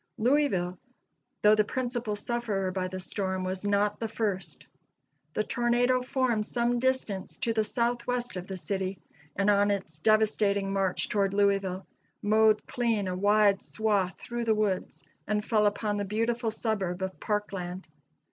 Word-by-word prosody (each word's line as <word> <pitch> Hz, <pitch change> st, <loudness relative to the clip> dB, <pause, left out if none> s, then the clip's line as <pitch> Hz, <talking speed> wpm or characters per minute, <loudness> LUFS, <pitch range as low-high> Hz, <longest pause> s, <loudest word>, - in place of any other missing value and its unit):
Louisville, 215 Hz, -9 st, +1 dB, 0.6 s
though 210 Hz, 0 st, +7 dB
the 215 Hz, 0 st, +4 dB
principal 240 Hz, -1 st, -2 dB
sufferer 205 Hz, -4 st, -2 dB
by 185 Hz, 0 st, -2 dB
the 185 Hz, 0 st, -6 dB
storm, 190 Hz, 0 st, -2 dB
was 185 Hz, +1 st, -3 dB
not 205 Hz, 0 st, +1 dB
the 225 Hz, -, -2 dB
first. 205 Hz, -4 st, -3 dB, 0.7 s
The 215 Hz, -, +1 dB
tornado 240 Hz, +2 st, +2 dB
formed 250 Hz, -4 st, 0 dB
some 240 Hz, 0 st, 0 dB
distance 255 Hz, -7 st, -1 dB
to 230 Hz, -, 0 dB
the 220 Hz, -1 st, +2 dB
southwest 240 Hz, +1 st, -1 dB
of 180 Hz, 0 st, -5 dB
the 190 Hz, -, -5 dB
city, 190 Hz, +1 st, -2 dB, 0.4 s
and 195 Hz, +1 st, +1 dB
on 205 Hz, 0 st, +4 dB
its 185 Hz, -6 st, -3 dB
devastating 205 Hz, -1 st, +2 dB
march 195 Hz, -2 st, +1 dB
toward 200 Hz, -1 st, 0 dB
Louisville 195 Hz, -2 st, +1 dB, 0.3 s
mowed 215 Hz, 0 st, +3 dB
clean 230 Hz, -5 st, 0 dB
a 180 Hz, -, -2 dB
wide 205 Hz, +1 st, +4 dB
swath 205 Hz, -4 st, 0 dB
through 240 Hz, -1 st, -4 dB
the 220 Hz, -1 st, +3 dB
woods, 205 Hz, -3 st, -1 dB, 0.2 s
and 210 Hz, 0 st, 0 dB
fell 215 Hz, -2 st, +3 dB
upon 205 Hz, 0 st, -1 dB
the 205 Hz, -, -1 dB
beautiful 230 Hz, +3 st, 0 dB
suburb 195 Hz, -5 st, -2 dB
of 190 Hz, 0 st, -4 dB
Parkland. 195 Hz, -4 st, -3 dB
210 Hz, 150 wpm, -28 LUFS, 195-230 Hz, 0.7 s, though